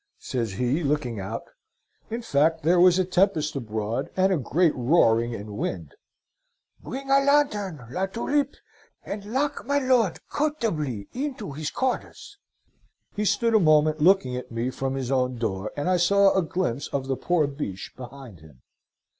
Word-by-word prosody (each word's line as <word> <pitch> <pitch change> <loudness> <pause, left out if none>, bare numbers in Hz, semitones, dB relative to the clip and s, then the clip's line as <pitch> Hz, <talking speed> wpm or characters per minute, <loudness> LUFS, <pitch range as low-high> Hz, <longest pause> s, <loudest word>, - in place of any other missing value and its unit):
says 115 -6 -3
he, 125 - 0
looking 140 -6 -1
out. 95 0 -5 0.7
In 235 +2 -4
fact 160 -3 +2
there 175 +3 +4
was 180 0 +6
a 185 - +2
tempest 180 -5 +1
abroad, 110 +1 -3
and 190 +1 +3
a - - +2
great 160 +4 +2
roaring, 120 -4 +3
and 105 0 -8
wind. 85 -7 -4 0.9
'Bring 270 +1 -6
a 275 - +6
lanthorn, 210 - +1
La 190 +6 -1
Tulipe, 275 +7 -1 0.5
and 200 0 -5
lock 275 +7 -1
my 285 0 +2
lord 255 - +2
comfortably 170 - -2
into 255 - -4
his 150 +2 -4
quarters!' 265 +9 -4 0.8
He 210 - -1
stood 230 +3 +2
a 220 - +6
moment 155 -2 +3
looking 160 -7 +4
at 125 - -6
me 115 +2 -2
from 135 0 -3
his 135 -1 -3
own 130 -2 +1
door, 105 -3 -3
and 145 - -2
I 185 0 +3
saw 195 +3 +4
a 190 - +3
glimpse 165 -7 -2
of 135 -2 -3
the 135 0 -1
poor 175 +2 +1
Biche 140 -10 -5
behind 125 - -10
him. 75 -5 -18
155 Hz, 165 wpm, -25 LUFS, 125-200 Hz, 0.9 s, was